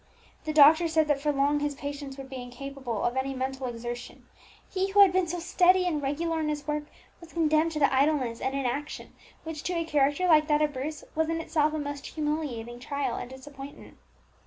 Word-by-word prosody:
The 310 Hz, -, -1 dB
doctor 310 Hz, +3 st, +7 dB
said 315 Hz, -1 st, +2 dB
that 280 Hz, -2 st, +2 dB
for 295 Hz, 0 st, +1 dB
long 285 Hz, +1 st, +2 dB
his 290 Hz, -1 st, -2 dB
patient 285 Hz, -1 st, -6 dB
would 270 Hz, -1 st, -8 dB
be 265 Hz, -1 st, -7 dB
incapable 250 Hz, -2 st, -5 dB
of 240 Hz, -, 0 dB
any 265 Hz, +1 st, -1 dB
mental 260 Hz, 0 st, -3 dB
exertion; 240 Hz, 0 st, -7 dB, 0.4 s
he 380 Hz, +1 st, -1 dB
who 405 Hz, +1 st, +5 dB
had 385 Hz, -3 st, +7 dB
been 370 Hz, -1 st, +2 dB
so 350 Hz, +2 st, -3 dB
steady 365 Hz, +1 st, +3 dB
and 315 Hz, -5 st, 0 dB
regular 320 Hz, +4 st, -1 dB
in 310 Hz, -1 st, -1 dB
his 295 Hz, -1 st, -3 dB
work, 300 Hz, 0 st, -2 dB, 0.3 s
was 335 Hz, -1 st, -14 dB
condemned 315 Hz, 0 st, +2 dB
to 305 Hz, -, -2 dB
the 280 Hz, -2 st, +3 dB
idleness 265 Hz, -4 st, +1 dB
and 265 Hz, +1 st, -1 dB
inaction 275 Hz, +2 st, -3 dB, 0.3 s
which, 320 Hz, -2 st, -6 dB
to 360 Hz, -, -2 dB
a 335 Hz, -1 st, -1 dB
character 290 Hz, +2 st, +2 dB
like 310 Hz, -3 st, +5 dB
that 300 Hz, 0 st, +3 dB
of 300 Hz, -1 st, 0 dB
Bruce, 285 Hz, +3 st, -5 dB
was 320 Hz, 0 st, 0 dB
in 330 Hz, 0 st, -1 dB
itself 310 Hz, -1 st, +1 dB
a -, -, -1 dB
most 285 Hz, -1 st, -5 dB
humiliating 295 Hz, -7 st, -3 dB
trial 270 Hz, -1 st, -2 dB
and 245 Hz, -, -6 dB
disappointment. 270 Hz, +1 st, -11 dB
295 Hz, 205 wpm, -28 LUFS, 270-315 Hz, 0.4 s, doctor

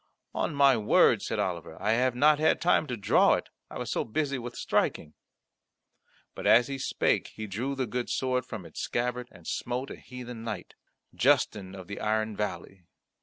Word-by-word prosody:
"On -, -, -1 dB
my 140 Hz, -2 st, +6 dB
word," 105 Hz, -1 st, +4 dB
said -, -, -3 dB
Oliver, 85 Hz, -3 st, -3 dB
"I 105 Hz, -, +1 dB
have 125 Hz, +2 st, +2 dB
not 150 Hz, +3 st, +5 dB
had 155 Hz, -, +3 dB
time 170 Hz, -2 st, +2 dB
to 125 Hz, -, -3 dB
draw 100 Hz, -, +4 dB
it; -, -, -5 dB, 0.2 s
I -, -, -7 dB
was -, -, -4 dB
so -, -, 0 dB
busy 140 Hz, +3 st, -2 dB
with 120 Hz, 0 st, -7 dB
striking." 75 Hz, -, -1 dB, 1.2 s
But -, -, -4 dB
as 120 Hz, +2 st, +7 dB
he 135 Hz, -1 st, -4 dB
spake -, -, +1 dB
he 110 Hz, -, -5 dB
drew 120 Hz, +8 st, -3 dB
the 130 Hz, -1 st, -1 dB
good 120 Hz, +2 st, -3 dB
sword 130 Hz, -1 st, 0 dB
from 105 Hz, -6 st, -8 dB
its 80 Hz, -, -9 dB
scabbard, 125 Hz, +1 st, -2 dB
and -, -, -16 dB
smote 125 Hz, +3 st, -3 dB
a -, -, -6 dB
heathen 125 Hz, -2 st, -9 dB
knight, 115 Hz, -, -6 dB, 0.4 s
Justin 95 Hz, -2 st, +1 dB
of 95 Hz, -2 st, -9 dB
the 100 Hz, +1 st, -7 dB
Iron 110 Hz, 0 st, 0 dB
Valley. 100 Hz, -2 st, -4 dB
120 Hz, 185 wpm, -28 LUFS, 105-130 Hz, 1.2 s, as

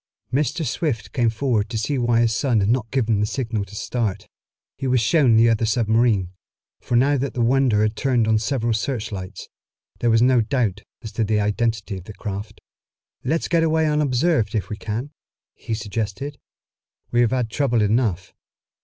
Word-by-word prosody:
Mr. 145 Hz, +4 st, 0 dB
Swift 125 Hz, -, -2 dB
came 120 Hz, -3 st, +2 dB
forward 115 Hz, -2 st, 0 dB
to 115 Hz, -, -3 dB
see 130 Hz, +5 st, -1 dB
why 120 Hz, -1 st, +2 dB
his 115 Hz, -1 st, +2 dB
son 120 Hz, -1 st, +1 dB
had 100 Hz, +1 st, +1 dB
not 115 Hz, -2 st, 0 dB
given 115 Hz, -5 st, +1 dB
the 105 Hz, -, +2 dB
signal 115 Hz, -4 st, -2 dB
to 100 Hz, +1 st, -11 dB
start. 110 Hz, -2 st, -3 dB, 0.5 s
He 135 Hz, -, -4 dB
was 125 Hz, -1 st, +3 dB
shown 125 Hz, -1 st, +4 dB
the 115 Hz, +1 st, +6 dB
other 115 Hz, -1 st, +2 dB
submarine, 110 Hz, -4 st, +2 dB, 0.5 s
for 120 Hz, -, -2 dB
now 140 Hz, +4 st, +4 dB
that 135 Hz, +1 st, -3 dB
the 120 Hz, -, 0 dB
Wonder 120 Hz, -3 st, +3 dB
had 110 Hz, 0 st, 0 dB
turned 125 Hz, -4 st, +1 dB
on 110 Hz, -1 st, +3 dB
several 115 Hz, -1 st, 0 dB
searchlights, 105 Hz, -5 st, -4 dB, 0.5 s
there 120 Hz, -, +1 dB
was 115 Hz, 0 st, +4 dB
no 125 Hz, -1 st, +4 dB
doubt 110 Hz, -3 st, -1 dB, 0.2 s
as 110 Hz, -, -6 dB
to 115 Hz, -, -1 dB
the 105 Hz, 0 st, +1 dB
identity 105 Hz, -1 st, -1 dB
of 90 Hz, -, -14 dB
the 105 Hz, -, -9 dB
craft. 105 Hz, +2 st, -6 dB, 0.6 s
"Let's 160 Hz, +6 st, 0 dB
get 170 Hz, -2 st, +2 dB
away 160 Hz, -1 st, +2 dB
unobserved 150 Hz, -5 st, +1 dB
if 105 Hz, -, -2 dB
we -, -, -2 dB
can," 115 Hz, +7 st, -4 dB, 0.4 s
he 110 Hz, -, -4 dB
suggested. 110 Hz, +6 st, -4 dB, 0.7 s
"We 120 Hz, -, +3 dB
have 120 Hz, -, +3 dB
had 125 Hz, -3 st, -1 dB
trouble 120 Hz, -6 st, +1 dB
enough." 105 Hz, -4 st, 0 dB
115 Hz, 180 wpm, -22 LUFS, 105-130 Hz, 0.7 s, the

